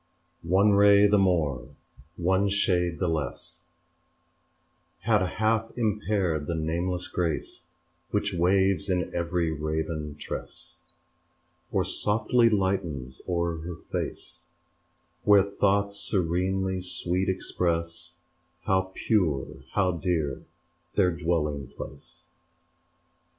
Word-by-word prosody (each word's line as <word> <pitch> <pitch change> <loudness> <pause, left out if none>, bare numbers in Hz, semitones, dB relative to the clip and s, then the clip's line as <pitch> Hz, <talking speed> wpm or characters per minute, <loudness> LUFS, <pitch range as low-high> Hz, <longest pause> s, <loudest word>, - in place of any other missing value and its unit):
One 95 +5 +4
ray 100 0 +6
the 105 0 +4
more, 75 -8 0 0.4
one 95 +3 +2
shade 90 -4 +1
the 90 - 0
less 80 +2 -4 1.4
Had 110 -3 +3
half 110 +4 0
impaired 105 -8 0
the 85 - -1
nameless 85 +3 -2
grace 85 -4 -2 0.5
Which 105 -1 0
waves 95 +3 +2
in 90 -1 0
every 85 -1 0
raven 75 0 -3
tress 70 +4 -7 0.9
Or - - +1
softly 115 +3 +2
lightens 95 - -1
o'er 85 -1 0
her 85 +2 -6
face, - - -6 0.8
Where 100 -2 +6
thoughts 100 0 +1
serenely 95 +1 0
sweet 90 +1 -1
express 85 -2 -2 0.5
How 95 -2 +1
pure, 85 -11 +1 0.3
how 95 -2 +2
dear 85 -4 -1 0.5
their 90 -3 +4
dwelling 75 -5 -1
place. - - -10
90 Hz, 100 wpm, -27 LUFS, 80-100 Hz, 1.4 s, ray